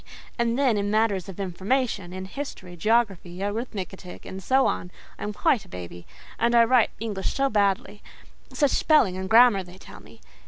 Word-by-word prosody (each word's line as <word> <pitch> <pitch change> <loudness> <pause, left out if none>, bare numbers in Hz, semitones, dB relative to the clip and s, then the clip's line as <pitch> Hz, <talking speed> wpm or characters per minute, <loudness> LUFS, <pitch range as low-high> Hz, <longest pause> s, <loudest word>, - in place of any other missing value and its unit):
And 235 0 +1
then, 260 -6 +2
in 205 0 -1
matters 210 -4 +1
of 195 - -9
information—in 190 -1 -2
history, 190 -6 -7
geography, 195 -3 0
arithmetic, 200 -4 -5
and 190 - -7
so 265 +7 +3
on, 180 - -1 0.3
I - - -13
am 210 - -3
quite 210 +1 +1
a - - -18
baby; 90 -1 -9 0.3
and 235 +1 +2
I 235 - +7
write 235 0 +4
English 205 -4 -3
so 275 0 +1
badly—such 205 - -2
spelling 295 - +3
and 190 0 -5
grammar, 230 -3 +6
they 180 0 -12
tell - - -13
me. - - -17
205 Hz, 165 wpm, -25 LUFS, 185-235 Hz, 0.3 s, I